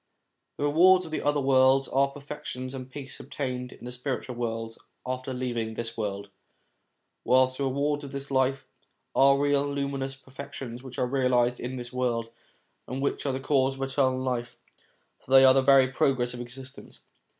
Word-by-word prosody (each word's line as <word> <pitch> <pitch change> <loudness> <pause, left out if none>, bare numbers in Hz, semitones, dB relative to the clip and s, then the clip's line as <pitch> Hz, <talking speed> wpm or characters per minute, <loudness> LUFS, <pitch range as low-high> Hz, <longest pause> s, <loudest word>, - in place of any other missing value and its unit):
The - - -3
rewards 180 +5 +5
of 160 - -9
the - - -2
other 145 0 +1
world 135 0 +4
are 135 +1 +4
the 140 - -13
perfections 140 -3 -7
and 130 -1 -6
the - - -25
peace 135 0 -8
obtained 130 -2 -4
in - - -12
the 125 - -5
spiritual 125 0 -4
worlds 115 -1 -4 0.3
after 130 +1 -4
leaving 120 -3 -3
this 115 0 -4
world; 100 -2 -4 0.9
whilst 130 +1 +3
the 140 - 0
rewards 145 +2 0
of 140 - -8
this 140 0 -6
life 130 0 +1 0.5
are 140 +1 +6
the 140 - 0
real 145 -1 +3
luminous 140 -1 -3
perfections 135 -2 -9
which 130 -1 -10
are - - +1
realised 125 -2 +1
in 125 +2 -4
this 120 0 -7
world, 120 -2 -1 0.6
and 130 +2 -4
which 140 +1 -1
are - - +1
the 130 - -2
cause 135 -1 +1
of 135 - -4
eternal 135 -1 +1
life, 125 -2 -3 0.6
for - - -23
they 135 0 +8
are 130 - +8
the 135 - +4
very 135 -1 +6
progress 130 -2 +1
of 120 - -6
existence. 130 +2 -9
130 Hz, 185 wpm, -27 LUFS, 125-140 Hz, 0.9 s, they